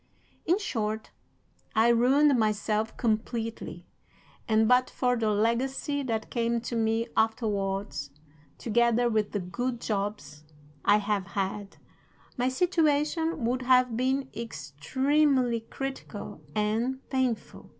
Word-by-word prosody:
In 350 +3 +4
short, 220 - -3 0.6
I 225 +2 +5
ruined 265 +5 +5
myself 215 0 0
completely; 225 -6 -2 0.6
and 220 0 +3
but 250 +1 +4
for 250 -1 +1
the 225 -2 0
legacy 245 +7 0
that 225 -5 -3
came 235 -1 0
to 235 - -4
me 225 0 +1
afterwards, 200 - -1 0.5
together 235 +1 +2
with 215 -2 0
the 205 - -1
good 240 +7 -3
jobs 195 -10 -3 0.4
I 205 - +5
have 205 -3 -1
had, 195 +1 -3 0.6
my 250 0 +1
situation 310 -1 +1
would 250 +2 0
have 250 -2 +4
been 265 +2 0
extremely 240 - +1
critical 265 - -6
and 230 +5 -1
painful. 260 -4 -2
230 Hz, 110 wpm, -28 LUFS, 210-255 Hz, 0.6 s, I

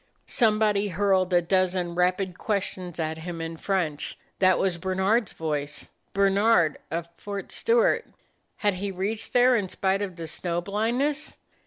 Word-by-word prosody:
Somebody 215 -3 +2
hurled 190 0 +2
a 175 -1 +4
dozen 185 -1 +1
rapid 180 +1 0
questions 185 -4 -3
at 160 0 -2
him 170 0 -6
in 165 0 -4
French. 165 -4 -2 0.2
That 185 -2 +5
was 180 -3 0
Bernard's 190 +5 +1
voice; 150 -2 -4 0.2
Bernard, 195 -4 +3
of 170 +1 -3
Fort 200 -1 -6
Stewart. 470 +2 +2 0.5
Had 205 -1 +1
he 195 +2 -3
reached 195 +4 -3
there, 250 0 +5
in 200 -5 0
spite 195 +2 0
of 195 -3 -4
the 165 -1 -6
snow 170 +1 -2
blindness? 235 - -1
190 Hz, 145 wpm, -26 LUFS, 175-205 Hz, 0.5 s, That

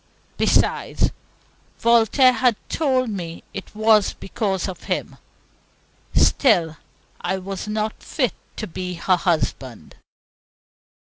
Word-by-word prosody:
Besides, - - +1 0.7
Voltaire 235 +3 +5
had 250 -2 +3
told 260 -6 +1
me 170 -4 -6
it 195 - -8
was 215 -1 +4
because 195 -2 -2
of 185 -3 -8
him. - - -3 1.0
Still, 170 - +3 0.4
I 190 - -1
was 195 +2 -6
not 215 +1 -2
fit 255 - -1 0.2
to - - -4
be 180 +1 -5
her 185 +2 +2
husband. 135 - -2
200 Hz, 105 wpm, -22 LUFS, 180-235 Hz, 1.0 s, Voltaire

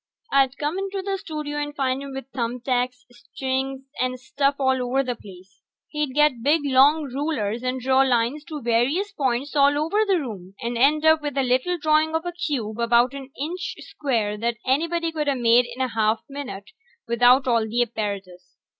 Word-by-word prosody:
I'd 270 -1 +3
come 305 +5 -2
into 390 0 -3
the 390 0 -2
studio 300 -3 -5
and 290 0 -5
find 265 -1 0
him 280 -1 -7
with 270 -2 -6
thumb 240 0 -2
tacks 250 0 -1
and 245 - -22
strings 265 +1 -3 0.2
and 255 0 -1
stuff 275 +2 0
all 265 -1 +1
over 255 +2 +1
the 250 -2 -3
place. 195 -2 -15 0.3
He'd 300 -3 -3
get 295 -5 +3
big 295 +5 +3
long 285 +3 +5
rulers 260 -5 -2
and 255 +1 -2
draw 260 +1 +3
lines 255 +2 +1
to 305 -5 -7
various 250 - +1
points 270 +1 -1
all 285 0 +4
over 330 +9 +1
the 380 -3 +3
room, 195 - -7
and 235 +1 -3
end 295 +6 +3
up 315 0 +5
with 290 -2 -4
a 270 - +3
little 255 +8 +1
drawing 310 0 +2
of 325 +2 -1
a 350 - -2
cube 250 -10 -3
about 235 +2 +3
an 270 -1 -8
inch 345 +5 -4
square 225 -7 -2
that 235 +1 -1
anybody 330 +5 0
coulda 300 -3 0
made 240 0 +4
in 240 +2 -7
a 260 - +1
half 220 -1 +1
a 275 - -14
minute 200 -9 -7 0.4
without 245 +3 +4
all 230 -3 +2
the 240 +2 +2
apparatus. 200 -5 -6
265 Hz, 195 wpm, -23 LUFS, 235-295 Hz, 0.4 s, long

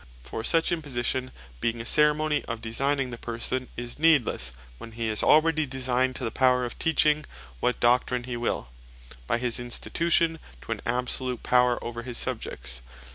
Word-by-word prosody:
For 90 - -6
such 165 +7 +3
imposition 130 -5 -1 0.3
being 115 - -1
a 115 - -5
Ceremony 150 +2 +3
of 115 -1 -4
designing 135 +4 -1
the 120 - -7
person, 120 +2 -2
is 120 0 -4
needlesse, 140 - +3 0.3
when 115 - -10
hee 115 0 -2
is 110 - 0
already 155 -1 +4
designed 130 0 0
to - - -5
the 115 - -1
Power 125 0 +3
of 120 - -8
Teaching 155 -1 +3 0.4
what 125 - 0
Doctrine 125 +1 +2
he 125 0 -5
will, 120 - -2 0.6
by - - +1
his 120 -1 +1
institution 165 +6 +1 0.2
to 65 - -8
an - - -3
Absolute 125 +1 -1
Power 125 -1 +3
over 120 0 -5
his 120 0 -5
Subjects. - - -3
125 Hz, 165 wpm, -26 LUFS, 120-145 Hz, 0.6 s, already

